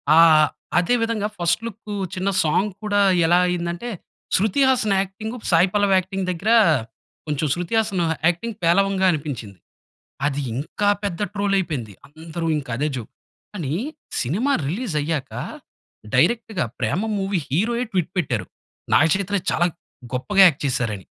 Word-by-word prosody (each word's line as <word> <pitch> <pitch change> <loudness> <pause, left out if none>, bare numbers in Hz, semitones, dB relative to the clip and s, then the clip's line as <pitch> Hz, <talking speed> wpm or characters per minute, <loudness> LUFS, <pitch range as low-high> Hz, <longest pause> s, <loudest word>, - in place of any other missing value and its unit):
ఆహ్, 160 -2 +7 0.3
అదే 180 +8 +2
విధంగా 225 -2 0
ఫస్ట్ 175 +4 +1
లుక్కు 215 -2 -7 0.2
చిన్న 190 +2 -1
సాంగ్ 190 +7 +1
కూడా 205 -1 +2 0.2
ఎలా 175 +2 +4
అయింది 175 -1 -1
అంటే, 240 +8 -6 0.5
శృతి 215 +7 +2
హాసన్ 220 -6 +2
యాక్టింగ్, 215 +4 -6 0.2
సాయి 175 +3 +5
పల్లవి 205 -2 +3
యాక్టింగ్ 190 +1 -2
దగ్గర, 190 +5 -2 0.8
కొంచెం 150 +1 -1
'శ్రుతి 175 +4 -4
హాసన్' 195 -4 -1 0.3
యాక్టింగ్ 205 +6 -1
పేలవంగా 190 +3 +3
అనిపించింది. 125 - -5 0.7
అది 145 -1 0
ఇంకా 205 +9 -1
పెద్ద 200 -1 -3
ట్రోల్ 200 -1 0
అయిపోయింది. 140 - -3
అందరు 160 +3 -7
ఇంకా 135 -5 -6
అదే 150 +2 0
జోక్. 115 - -8 0.4
కాని, 155 -8 -3 0.5
సినిమా 205 - 0 0.2
రిలీజ్ 190 - -3
అయ్యాక, 145 -3 -3 0.8
డైరెక్ట్‌గా 215 - +2
'ప్రేమం' 190 - -1
మూవీ 195 -2 0
హీరోయే 230 - 0
ట్విట్ 180 -2 -1
పెట్టారు. 120 - -1 0.5
నాగ 155 - +6
చైతన్య 200 0 -1
చాలా 175 +2 +2 0.5
గొప్పగా 190 +10 +4
యాక్ట్ 150 -4 -1
చేసారని. 115 -7 -2
180 Hz, 140 wpm, -22 LUFS, 155-205 Hz, 0.8 s, ఆహ్